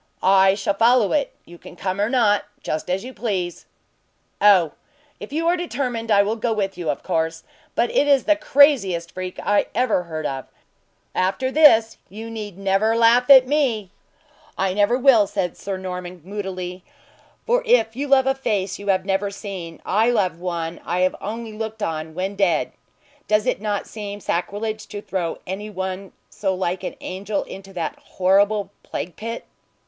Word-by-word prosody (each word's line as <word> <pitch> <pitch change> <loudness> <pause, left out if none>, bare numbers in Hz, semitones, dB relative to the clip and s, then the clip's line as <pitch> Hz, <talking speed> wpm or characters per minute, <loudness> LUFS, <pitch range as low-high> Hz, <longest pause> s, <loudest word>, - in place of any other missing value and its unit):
"I 190 0 +5
shall 200 0 -1
follow 230 +1 +4
it! 285 -3 +1
You 175 0 -14
can - - -12
come 185 +2 -2
or 210 - +1
not, 215 -6 +2 0.2
just 155 +3 -3
as 185 +2 -1
you 255 +1 -8
please." 185 -8 -3 0.7
"Oh! 190 -7 +6 0.5
if - - -9
you 325 +3 -1
are 345 - +4
determined, 250 -9 -3
I 200 -2 +5
will 215 +3 -1
go 230 +1 -1
with 195 -3 -2
you, 170 -3 -4
of 145 - -2
course; 165 0 -1 0.3
but 240 - +1
it 290 - +2
is 280 -2 +4
the 310 - +4
craziest 265 - +3
freak 185 0 -6
I 205 0 +2
ever 245 -7 +2
heard 155 -2 -5
of. 135 -2 -4 0.7
After 195 +8 0
this, 230 -7 +5
you 220 +3 -8
need 210 -4 -7
never 195 +3 +1
laugh 235 +2 +4
at 265 -2 +9
me." 250 -9 0 0.7
"I 190 -1 0
never 205 +5 +3
will," 245 -6 +5
said 180 -3 -2
Sir 195 -1 -5
Norman, 180 -2 -7
moodily; 185 -2 -5 0.6
"for - - +2
if 460 - +3
you 280 +3 -3
love 270 -1 +4
a 270 - +3
face 210 -8 -2
you 200 - -9
have 190 -1 +2
never 195 +1 0
seen, 195 -5 -7
I 220 +4 +2
love 190 -8 +1
one 170 -2 -4
I 175 +1 -1
have 185 0 +2
only 225 +2 -5
looked 220 0 -5
on 155 0 -3
when 190 +3 -3
dead. 185 -6 +1 0.6
Does 210 0 +2
it - - 0
not 205 -2 -2
seem 205 -2 -7
sacrilege 210 +4 -3
to 205 -1 -6
throw 185 -4 -3
any 200 +3 -5
one 190 -1 -5 0.2
so 190 -2 -2
like 185 0 -2
an - - -4
angel 195 +2 -3
into 195 0 -10
that 170 -3 -4
horrible 200 +2 +1
plague 175 - -6
pit?" 230 +2 -6
200 Hz, 175 wpm, -22 LUFS, 185-230 Hz, 0.7 s, at